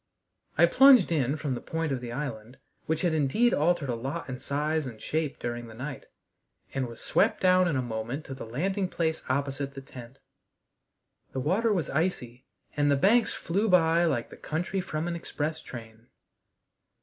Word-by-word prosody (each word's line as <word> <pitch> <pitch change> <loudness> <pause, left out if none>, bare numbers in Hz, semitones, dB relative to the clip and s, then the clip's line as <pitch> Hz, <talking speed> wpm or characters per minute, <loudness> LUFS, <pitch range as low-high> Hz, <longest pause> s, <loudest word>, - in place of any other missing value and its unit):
I 170 - +7
plunged 250 0 +7
in 145 -2 +1
from 145 -4 -2
the 120 - -4
point 165 -2 -2
of 130 -2 -2
the 120 -1 -6
island, 120 -3 -5 0.3
which 160 0 0
had 175 -3 +1
indeed 160 - +2
altered 165 -1 +2
a - - +1
lot 130 +4 -4
in 125 -1 -5
size 150 +2 -1
and 115 -3 -9
shape 155 +2 -2
during 120 0 -4
the 110 - -11
night, 130 +4 -6 0.7
and 135 -2 -1
was 115 -1 -10
swept - - +2
down 185 -1 +4
in 165 - 0
a 130 - 0
moment 120 +5 -4
to 135 - -6
the 135 - -7
landing 190 - -1
place 160 -2 -1
opposite 140 +1 -2
the - - -5
tent. 125 -1 -12 1.2
The 135 - -2
water 195 - +1
was 180 -6 0
icy, 130 -6 -2 0.3
and 145 0 +2
the 140 - +4
banks 215 - +3
flew 200 +6 0
by 170 -1 +4
like 120 -8 -1
the - - -11
country 175 +5 -2
from 160 -2 -3
an 175 - -2
express 155 -1 -3
train. 115 -1 -11
145 Hz, 185 wpm, -28 LUFS, 125-170 Hz, 1.2 s, I